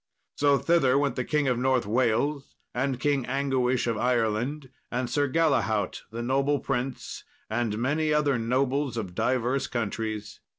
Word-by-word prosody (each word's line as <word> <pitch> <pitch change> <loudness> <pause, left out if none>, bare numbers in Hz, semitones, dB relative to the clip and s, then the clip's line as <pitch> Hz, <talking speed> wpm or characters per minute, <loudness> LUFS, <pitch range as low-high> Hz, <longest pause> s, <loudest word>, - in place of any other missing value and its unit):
So 145 -1 +4
thither 140 -5 +3
went 140 0 +1
the 125 - -1
King 150 +1 0
of 125 -2 +1
North 130 -2 +2
Wales, 125 +6 0 0.2
and 130 0 -1
King 140 0 +1
Anguish 130 -2 +1
of 115 -2 -1
Ireland, 125 +4 0 0.2
and 125 +1 -1
Sir 145 +2 0
Galahaut 130 - +1
the 115 +2 -5
noble 135 +3 +1
prince, 130 -1 -3 0.3
and 110 -2 -1
many 150 +6 0
other 145 -4 +2
nobles 130 +3 0
of 95 -6 -4
divers 125 +5 0
countries. 110 -2 -4
130 Hz, 145 wpm, -27 LUFS, 120-140 Hz, 0.3 s, So